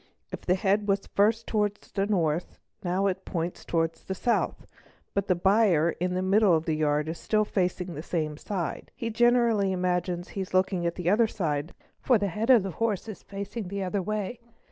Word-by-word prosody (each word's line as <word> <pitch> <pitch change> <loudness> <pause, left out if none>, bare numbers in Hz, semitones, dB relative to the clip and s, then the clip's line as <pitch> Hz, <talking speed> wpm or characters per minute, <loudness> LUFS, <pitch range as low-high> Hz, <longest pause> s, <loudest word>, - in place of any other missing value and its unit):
If - - -6
the 180 - +2
head 200 +2 +1
was 195 0 +1
first 220 +3 +2
towards 205 -1 -1
the 195 0 0
north 170 -5 0
it 215 - -23
now 185 +3 +1
points 175 -2 -4
towards 165 -1 -1
the 190 - -4
south, 235 +5 0 0.5
but 200 0 -1
the 185 - +3
buyer 185 -3 +3
in 180 +2 -2
the 185 - 0
middle 195 0 +4
o 160 - +4
the 160 0 -2
yard 150 0 +1
is 160 +1 -4
still 215 -1 +1
facing 180 -2 -1
the 150 - -5
same 155 -2 -2
side; 175 +1 -4
he 230 -1 -3
generally 235 -3 +3
imagines 180 -1 -1
he 195 - -4
is 185 0 -5
looking 185 -2 +2
at 170 - -2
the 180 -2 -4
other 225 +2 +4
side 160 -6 -2 0.2
for 250 - +3
the 200 -1 -1
head 215 +7 -3
of 240 -6 +7
the 195 - -3
horse 220 +1 -1
is 215 - -7
facing 200 +1 -6
the 200 +1 -3
other 190 +2 -1
way. 215 +4 -3
190 Hz, 205 wpm, -27 LUFS, 175-210 Hz, 0.5 s, of